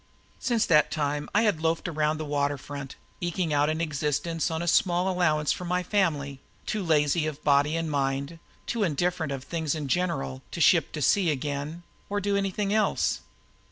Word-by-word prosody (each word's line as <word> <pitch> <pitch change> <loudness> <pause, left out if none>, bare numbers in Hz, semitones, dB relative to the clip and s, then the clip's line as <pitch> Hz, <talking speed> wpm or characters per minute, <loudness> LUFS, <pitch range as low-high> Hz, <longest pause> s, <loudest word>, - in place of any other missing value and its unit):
Since 235 -4 +1
that 150 -3 +4
time 145 -1 -2
I 215 - +5
had 205 -8 +1
loafed 165 +2 0
around 155 -2 0
the 155 - -4
water 145 -1 0
front, 140 0 -7 0.3
eking 175 -2 -1
out 145 +1 +3
an 155 +1 -1
existence 155 +1 -1
on 160 +1 -2
a - - -4
small 175 +1 +3
allowance 155 -5 +2
from 180 - -3
my 180 +1 0
family, 150 -9 0 0.3
too 215 - -2
lazy 155 -1 +2
of 150 -1 -6
body 145 +2 +3
and 165 -1 -2
mind, 140 +2 -1 0.3
too 230 - -2
indifferent 175 -2 0
to 140 -1 -3
things 160 +1 -2
in 150 -3 -4
general, 70 - -1
to - - -6
ship - - +4
to 150 - -2
sea 185 +4 +3
again 145 +3 -3 0.3
or 205 0 0
do 205 0 0
anything 200 +1 0
else. 215 -2 +1
155 Hz, 185 wpm, -27 LUFS, 145-180 Hz, 0.3 s, I